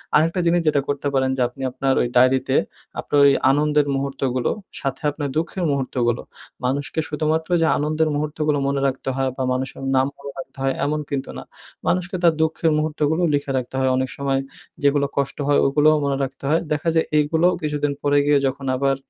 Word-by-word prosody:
আরেকটা 165 +4 +3
জিনিস 170 +1 +3
যেটা 145 -2 +3
করতে 145 0 -2
পারেন 130 -1 +2
যে - - 0
আপনি 125 +3 -13
আপনার 135 +1 0
ওই - - +1
ডায়রিতে 130 +1 +3 0.4
আপনার 145 - +1
ওই 140 - +7 0.2
আনন্দের 150 +1 +2
মুহূর্তগুলো, 135 -2 -1 0.3
সাথে 135 -1 -3
আপনার 145 -1 -4
দুঃখের 170 +3 -2
মুহূর্তগুলো। 125 -3 -1 0.4
মানুষকে 140 +4 -1
শুধুমাত্র 155 +2 -1
যে 165 - +3
আনন্দের 155 +2 0
মুহূর্তগুলো 150 0 -1
মনে 140 0 0
রাখতে 135 0 -3
হয় 135 0 0
বা 130 - -1
মানুষের 130 +1 -4
নাম 130 0 +3
মনে 140 0 -8
রাখতে 135 - -9
হয় 135 0 +1
এমন 150 +1 0
কিন্তু 140 -1 -3
না। - - -7 0.4
মানুষকে 180 +1 0
তার 170 -1 +5
দুঃখের 160 0 +1
মুহূর্তগুলো 155 +1 0
লিখে 145 -1 0
রাখতে 130 0 -4
হয় 130 0 +2
অনেক 130 0 -1
সময় 135 -1 0 0.4
যেগুলো 140 0 +3
কষ্ট 140 -1 -1
হয় 145 - +4
ওগুলোও 150 +3 +4
মনে 140 -1 0
রাখতে 135 +1 -6
হয়। 160 +2 +3
দেখা 150 +2 0
যায় 160 - +3
এগুলোও 160 +4 +2
কিছুদিন 150 -1 -1
পরে 145 0 +2
গিয়ে 145 -1 +4
যখন 135 +1 -4
আবার 135 +1 +1
145 Hz, 185 wpm, -22 LUFS, 135-155 Hz, 0.4 s, ওই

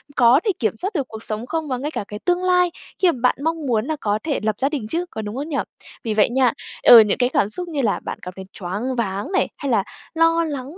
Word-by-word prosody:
có 245 +2 +6
thể 420 - +3
kiểm 220 -3 0
soát 390 - -3
được 280 -8 -1
cuộc 220 -1 -9
sống 215 +2 -4
không 320 +3 -3
và 255 -3 -1
ngay 290 +4 -4
cả - - -3
cái 210 - -7
tương 355 0 +1
lai, 360 -1 +3 0.3
khi 370 -3 +4
mà 265 - -7
bạn 250 - +3
mong 325 -1 -1
muốn 230 -4 +1
là 315 +2 -1
có 210 0 0
thể 300 -3 -1
lập 215 -1 0
gia 275 - +2
đình 275 -8 -4
chứ, 340 +8 -2
có 220 - -5
đúng 210 +1 -6
không 290 +5 -4
nhỉ? 280 - -1 0.5
Vì 225 - -1
vậy 210 -1 +4
nha, 250 0 +3 0.3
ừ, 235 - +10
những 210 -2 +3
cái 245 -1 +2
cảm 205 -5 +1
xúc 355 +10 -5
như 305 -4 -2
là 220 -5 +1
bạn - - -6
cảm 180 - -7
thấy 190 - -8
choáng 205 +8 -3
váng 205 - -2
này, 380 - +2
hay 280 -3 -3
là 210 -4 +3 0.3
lo 330 0 +3
lắng 285 +1 -6
260 Hz, 280 wpm, -21 LUFS, 220-320 Hz, 0.5 s, ừ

